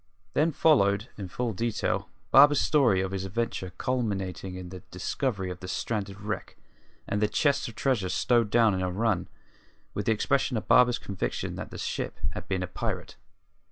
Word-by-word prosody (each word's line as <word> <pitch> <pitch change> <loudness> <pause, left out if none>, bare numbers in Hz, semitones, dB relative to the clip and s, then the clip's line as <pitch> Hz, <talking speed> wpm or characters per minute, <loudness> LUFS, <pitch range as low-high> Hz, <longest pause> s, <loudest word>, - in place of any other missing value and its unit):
Then 160 +3 +3
followed, 110 -9 +3
in 100 -3 -6
full 120 +5 -2
detail, 115 +3 -1 0.2
Barber's 145 +1 +8
story 125 -11 +3
of 95 0 -2
his 95 -1 -3
adventure 95 -1 -2
culminating 95 -8 -2
in 90 -1 -7
the 95 0 -8
discovery 95 +1 -2
of 90 - -7
the 90 - -8
stranded 100 0 -3
wreck 105 +1 -5 0.5
and 105 - -1
the 105 - +4
chests 140 +5 +1
of 115 - -9
treasure 120 -9 0
stowed 120 +2 +2
down 115 -1 +4
in 95 - -1
her 90 0 0
run, 105 0 0 0.7
with 105 - -3
the - - +4
expression 125 +3 +1
of 110 - -5
Barber's 125 -1 +6
conviction 100 -4 -3
that - - -6
the - - -8
ship - - -3
had - - -7
been 95 -1 -1
a - - -3
pirate. 90 - -4
105 Hz, 180 wpm, -28 LUFS, 95-125 Hz, 0.7 s, Barber's